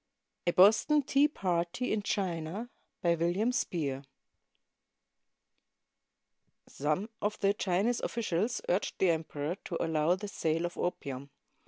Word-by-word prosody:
A - - +5
"BOSTON 220 - +5
TEA 275 +2 +4
PARTY" 180 - -1
IN 215 - 0
CfflNA 190 +2 -2 0.3
BY 170 -1 +4
WILLIAM 175 +8 +1
SPEER 145 - -2 2.6
[Some 155 +8 -1
of 210 +1 -1
the 200 0 +4
Chinese 205 +5 +1
officials 220 0 -1
urged 185 +3 0
the 185 -3 +4
emperor 160 +1 -3
to 170 - -3
allow 160 +1 +2
the 205 +2 -6
sale 165 -4 -1
of 175 - -4
opium. 140 -6 -3
180 Hz, 120 wpm, -31 LUFS, 165-210 Hz, 2.6 s, A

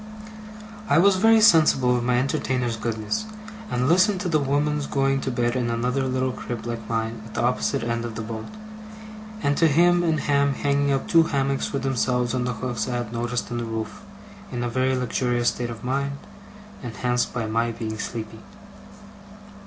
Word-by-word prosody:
I 145 - +4
was 190 +3 +5
very 225 +3 +5
sensible 155 - +5
of 120 - -1
my 120 0 +2
entertainer's 125 -2 0
goodness, 110 - -3 0.4
and 125 +1 0
listened 185 +4 +4
to 185 - -2
the 155 -2 +2
women's 145 +1 0
going 135 0 +1
to - - -2
bed 120 -1 0
in 120 -2 0
another 125 +3 0
little 130 0 0
crib 115 -1 -6
like 115 -2 -5
mine 115 -1 -2
at 110 - -12
the - - 0
opposite 125 +2 0
end 115 0 -2
of 115 -2 -5
the 110 - -4
boat, 110 0 -6 1.0
and 140 0 +2
to 165 - +5
him 175 +3 +4
and 160 -3 +1
Ham 140 -1 +2
hanging 140 0 +1
up 135 -1 -1
two 165 - +6
hammocks 140 -3 0
for 140 - -3
themselves 125 -2 0
on 125 -1 -1
the 125 - -1
hooks 120 -1 -3
I 125 -1 -1
had 120 -2 -5
noticed 120 +1 -3
in 120 - -2
the - - -3
roof, 110 -1 -5 0.5
in 120 -1 -3
a 120 - -1
very 130 +2 +1
luxurious 125 -1 0
state 120 -1 -4
of 115 -3 -8
mind, 140 +2 -1 0.6
enhanced 125 +1 -1
by 120 -2 -3
my 115 +2 0
being 110 -1 -5
sleepy. 110 -1 -5
125 Hz, 185 wpm, -24 LUFS, 115-140 Hz, 1.0 s, two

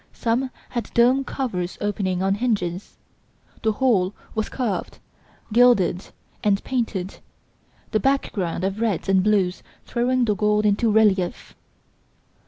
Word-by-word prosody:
Some 245 +3 0 0.2
had 240 -2 -4
domed 255 +3 +4
covers 185 -10 -3
opening 190 -3 -1
on 195 0 +2
hinges 200 -5 -2 0.6
the 220 -1 +1
whole 205 -6 +1 0.2
was 220 -1 -2
carved, 240 -7 -3 0.6
gilded 230 -6 +4 0.4
and 205 -2 +2
painted, 220 -7 -3 0.7
the 215 - +2
background 200 -9 -1
of 195 +3 -2
reds 215 -7 -1
and 190 -1 +4
blues 190 -3 +1 0.2
throwing 250 +1 +1
the 210 - +2
gold 210 +1 +1
into 210 +2 +2
relief. 205 -4 +2
210 Hz, 120 wpm, -23 LUFS, 190-240 Hz, 0.7 s, domed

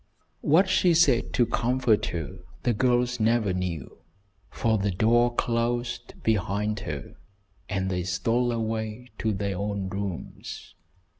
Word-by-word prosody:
What 170 +6 +4
she 185 -2 +4
said 140 -8 +4
to 120 - +4
comfort 120 -2 +1
her 80 -5 -5 0.2
the 120 - +2
girls 125 +1 +2
never 110 -3 +2
knew, 90 -7 -4 0.5
for 110 -2 +1
the 100 +1 0
door 120 +5 +3
closed 120 0 -1
behind 105 0 0
her 75 -1 -6 0.5
and 95 -2 -1
they 90 -1 0
stole 115 +8 +1
away 110 +1 -3
to 110 - +1
their 100 -2 -2
own 100 -2 -2
rooms. 95 -2 -6
110 Hz, 130 wpm, -26 LUFS, 100-120 Hz, 0.5 s, What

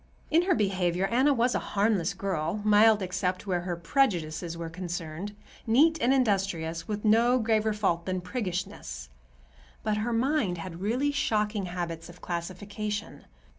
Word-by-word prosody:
In 325 +2 +5
her 365 -2 +3
behavior 185 - +1
Anna 255 +7 +3
was 245 -2 +2
a - - +1
harmless 200 -4 0
girl, 185 -1 -2
mild 210 0 +5
except 185 0 -2
where 180 -3 0
her 175 0 -3
prejudices 170 - 0
were 170 -1 -4
concerned, 175 +2 -5 0.3
neat 305 +7 +4
and 245 - +3
industrious, 190 -10 0
with 210 0 -3
no 230 +4 +5
graver 220 -2 +2
fault 190 -5 0
than 185 0 -1
priggishness; 180 - -4 0.7
but 215 -1 0
her 220 +3 -1
mind 235 - +1
had 170 +1 -7
really 250 +8 +1
shocking 210 -7 0
habits 170 -2 -5
of 175 - -13
classification. 205 +4 -5
200 Hz, 145 wpm, -28 LUFS, 175-225 Hz, 0.7 s, In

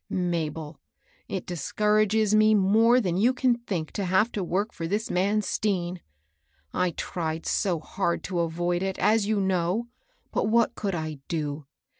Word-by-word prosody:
^^ - - -56
Mabel, 160 -3 -2 0.5
it 190 -3 -4
discourages 210 +5 +1
me 215 0 +5
more 220 +5 +4
than 180 -7 -1
you 240 +6 +3
can 255 -1 +3
think 180 -9 -4
to 200 - -3
have 190 +6 +2
to 200 - -2
work 195 +5 -1
for 165 - -4
this 210 +5 -2
man 200 +4 +1
Stean. 185 -3 -1 0.7
I 180 0 +1
tried 165 -1 -4
so 180 -6 0
hard 170 +2 -2
to 180 -2 -2
avoid 175 +1 0
it, 190 0 -2
as 215 -1 +2
you 215 -1 +1
know. 190 +4 0 0.4
But - - 0
what 230 +1 +3
could 200 -3 -3
I 155 -3 -4
do 150 -3 -3
190 Hz, 165 wpm, -26 LUFS, 170-215 Hz, 0.7 s, me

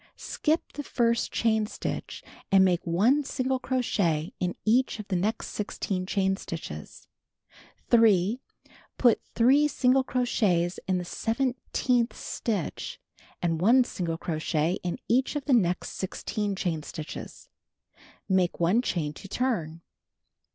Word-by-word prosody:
Skip 315 +2 -1
the 290 - -4
first 235 -3 +1
chain 220 -2 +1
stitch, - - -5 0.3
and 190 -1 +6
make 180 -2 +1
1 225 +13 +3
single 260 -1 -1
crochet 195 - 0
in 180 -1 -1
each 245 +3 +3
of 215 -2 -8
the 190 - 0
next 210 +6 -1
16 190 -3 -3
chain 195 -1 +1
stitches. 75 - -8 0.8
3. 225 -1 +4 0.6
Put 240 -3 +4
3 270 +6 +5
single 265 -2 +3
crochets 200 -9 +1
in 185 -1 +2
the 180 - -3
seventeenth 245 +2 0
stitch, 205 -8 -3 0.4
and 165 -2 0
1 245 +7 +6
single 170 -8 -3
crochet 160 +1 -1
in 175 -1 -3
each 255 +5 +2
of 290 -2 -3
the 280 - +2
next 180 -7 +2
16 200 +2 -3
chain 170 -5 -2
stitches. 150 +1 -8 0.8
Make 185 -2 +1
1 180 +8 +3
chain 155 -11 -2
to 195 - -11
turn. 175 -10 -2
205 Hz, 130 wpm, -27 LUFS, 175-245 Hz, 0.8 s, and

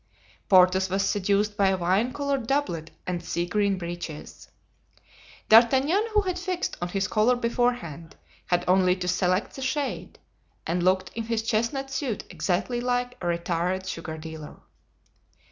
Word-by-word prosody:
Porthos 185 0 +5
was 195 +1 0
seduced 205 +1 +1
by 200 -2 +3
a 190 0 +2
wine 190 +7 +1
colored 280 -3 -2
doublet 235 - -1 0.2
and 175 -1 -3
sea 170 +1 -2
green 200 +1 +1
breeches. 170 -3 -7 1.0
D'Artagnan, 270 - +5
who 420 - +6
had 365 -2 -3
fixed 365 -1 -3
on 175 - -1
his 195 +3 -1
color 220 +4 +3
beforehand, 235 - -2 0.3
had 175 0 +1
only 185 0 +4
to 180 -1 -5
select 180 +2 0
the 270 - -7
shade, 270 +1 -3 0.5
and 175 +2 -1
looked 185 +1 +2
in 230 -1 -4
his 225 -1 -1
chestnut 235 +5 -1
suit 265 -7 -2
exactly 215 +7 -1
like 245 0 -1
a 175 - -3
retired 175 +2 -1
sugar 160 -4 -5
dealer. 160 -1 -9
200 Hz, 145 wpm, -26 LUFS, 180-245 Hz, 1.0 s, who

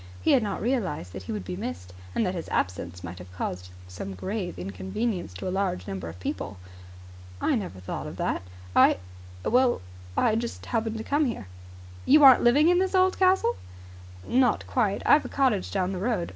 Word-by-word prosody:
He 90 - +2
had 260 - +5
not 205 -3 -3
realized 190 - -1
that 95 - -6
he 95 - -7
would 105 -4 -4
be 90 -1 -4
missed, 90 +2 -6 0.2
and 225 - +2
that 185 - -1
his 170 -3 -5
absence 90 -1 -2
might 90 0 -7
have 90 0 -11
caused 90 0 -4 0.5
grave 190 - -4
inconvenience 100 - -3
to 90 - -5
a - - -1
large 190 - -1
number 95 -4 -5
of 85 +2 -10
people. 95 +1 -4 0.8
"I - - +1
never 195 - -3
thought 90 - -5
of - - -8
that. - - -1 0.3
I - - +6 0.5
well, 250 +1 +3 0.4
I 220 - +3
just 235 0 -4
happened 225 -1 -1
to 220 - -5
come 290 +4 +1
here." 230 - -3 0.6
"You 295 +2 +7
aren't 265 -3 +9
living 280 +6 +5
in 355 +1 +5
this 380 +1 0
old 375 0 +3
castle?" 370 -10 +3 0.7
"Not 250 -2 +2
quite. 215 -6 0
I've 300 - +6
a - - -5
cottage 255 -9 +1
down 190 -1 0
the 185 - -3
road. 205 -4 -1
195 Hz, 190 wpm, -27 LUFS, -, 0.8 s, aren't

